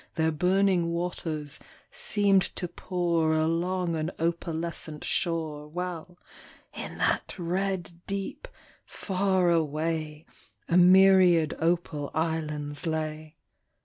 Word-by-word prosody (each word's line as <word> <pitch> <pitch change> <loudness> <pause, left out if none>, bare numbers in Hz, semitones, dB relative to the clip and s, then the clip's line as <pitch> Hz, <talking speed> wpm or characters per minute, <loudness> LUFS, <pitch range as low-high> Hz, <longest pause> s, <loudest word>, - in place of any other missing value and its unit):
Their 160 -1 +2
burning 180 +2 +2
waters 165 -4 -3 0.3
seemed 200 -2 +3
to 180 - -3
pour 170 -3 0
Along 170 +2 0
an 155 +1 -1
opalescent 165 -2 -2
shore, 160 -3 -2
While, 180 +1 -6 0.6
in - - -7
that - - 0
red 180 -1 -2
deep, 200 - -4 0.4
far 190 -2 0
away, 155 -1 -1 0.4
A 170 - +1
myriad 180 -3 +6
opal 165 -3 0
islands 155 -1 -2
lay. 155 0 -3
170 Hz, 95 wpm, -27 LUFS, 155-180 Hz, 0.6 s, myriad